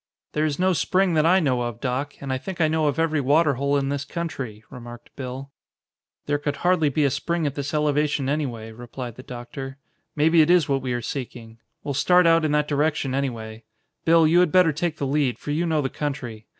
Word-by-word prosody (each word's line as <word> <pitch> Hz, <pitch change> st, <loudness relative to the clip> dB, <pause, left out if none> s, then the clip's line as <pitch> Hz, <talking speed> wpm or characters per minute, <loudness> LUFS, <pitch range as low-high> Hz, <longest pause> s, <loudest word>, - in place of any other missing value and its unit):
"There 150 Hz, +1 st, +1 dB
is 145 Hz, -2 st, -1 dB
no 185 Hz, +1 st, +2 dB
spring 185 Hz, +1 st, +1 dB
that 155 Hz, 0 st, +3 dB
I 185 Hz, +2 st, +5 dB
know 130 Hz, -7 st, +1 dB
of, 120 Hz, -1 st, -4 dB
Doc, 135 Hz, +3 st, -3 dB
and 135 Hz, -1 st, -3 dB
I 130 Hz, -, -2 dB
think 190 Hz, +4 st, -7 dB
I 160 Hz, -, +4 dB
know 155 Hz, -1 st, +1 dB
of 145 Hz, -, 0 dB
every 160 Hz, -2 st, +1 dB
water 145 Hz, +3 st, +3 dB
hole 140 Hz, +2 st, 0 dB
in 135 Hz, -1 st, -1 dB
this 140 Hz, 0 st, -2 dB
country," 135 Hz, -12 st, -5 dB
remarked 120 Hz, -2 st, -11 dB
Bill. 135 Hz, +1 st, -7 dB, 0.7 s
"There 145 Hz, 0 st, 0 dB
could 145 Hz, 0 st, -2 dB
hardly 175 Hz, -4 st, +3 dB
be 150 Hz, +2 st, 0 dB
a 140 Hz, -, +2 dB
spring 170 Hz, +4 st, -1 dB
at 145 Hz, -, -1 dB
this 140 Hz, 0 st, -4 dB
elevation, 150 Hz, -2 st, +1 dB
anyway," 125 Hz, -7 st, -3 dB
replied 120 Hz, +1 st, -8 dB
the 130 Hz, -, -11 dB
doctor. 130 Hz, +2 st, -8 dB, 0.4 s
"Maybe 160 Hz, +2 st, +4 dB
it 155 Hz, -, +3 dB
is 175 Hz, -4 st, +4 dB
what 135 Hz, -2 st, 0 dB
we 130 Hz, -1 st, -2 dB
are 120 Hz, -1 st, -3 dB
seeking. 115 Hz, -3 st, -6 dB, 0.2 s
We'll 145 Hz, -, -3 dB
start 180 Hz, +6 st, +4 dB
out 165 Hz, 0 st, +5 dB
in 155 Hz, -, +1 dB
that 150 Hz, 0 st, +2 dB
direction, 145 Hz, -2 st, 0 dB
anyway. 115 Hz, -5 st, -4 dB, 0.4 s
Bill, 165 Hz, 0 st, +5 dB
you 165 Hz, +3 st, +4 dB
had 180 Hz, -3 st, +3 dB
better 180 Hz, -4 st, +4 dB
take 160 Hz, +1 st, -2 dB
the 140 Hz, -, -2 dB
lead, 135 Hz, -2 st, 0 dB
for 145 Hz, -, -6 dB
you 165 Hz, +4 st, 0 dB
know 155 Hz, -2 st, +1 dB
the -, -, 0 dB
country. 125 Hz, -7 st, -5 dB
145 Hz, 225 wpm, -24 LUFS, 130-160 Hz, 0.7 s, I